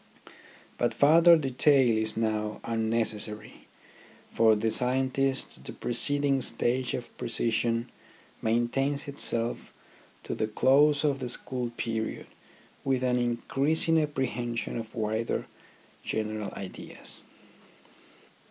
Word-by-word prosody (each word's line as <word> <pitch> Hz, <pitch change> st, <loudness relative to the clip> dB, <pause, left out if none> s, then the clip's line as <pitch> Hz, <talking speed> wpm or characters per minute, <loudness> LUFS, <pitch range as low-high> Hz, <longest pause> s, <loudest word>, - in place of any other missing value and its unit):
But 120 Hz, -, 0 dB
further 165 Hz, +4 st, +6 dB
detail 135 Hz, -1 st, +3 dB
is 110 Hz, 0 st, -1 dB
now 105 Hz, -1 st, -1 dB
unnecessary. 110 Hz, -2 st, -2 dB, 0.6 s
For 110 Hz, -1 st, +4 dB
the 110 Hz, +1 st, 0 dB
scientists 130 Hz, +2 st, +2 dB
the -, -, -9 dB
preceding 140 Hz, +3 st, +1 dB
stage 125 Hz, 0 st, -1 dB
of 120 Hz, -, -8 dB
precision 115 Hz, 0 st, 0 dB, 0.5 s
maintains 135 Hz, +6 st, 0 dB
itself 120 Hz, -4 st, -2 dB, 0.5 s
to -, -, -4 dB
the 110 Hz, -, -1 dB
close 140 Hz, +6 st, +3 dB
of 140 Hz, -2 st, +1 dB
the 125 Hz, -2 st, -4 dB
school 125 Hz, 0 st, -2 dB
period 110 Hz, -1 st, -3 dB, 0.6 s
with 130 Hz, -2 st, 0 dB
an 125 Hz, -1 st, +1 dB
increasing 140 Hz, +7 st, +1 dB
apprehension 120 Hz, -5 st, -3 dB
of 115 Hz, -1 st, -6 dB
wider 110 Hz, +1 st, -2 dB, 0.6 s
general 110 Hz, -1 st, -3 dB
ideas. 95 Hz, -2 st, -9 dB
120 Hz, 100 wpm, -28 LUFS, 110-135 Hz, 0.6 s, further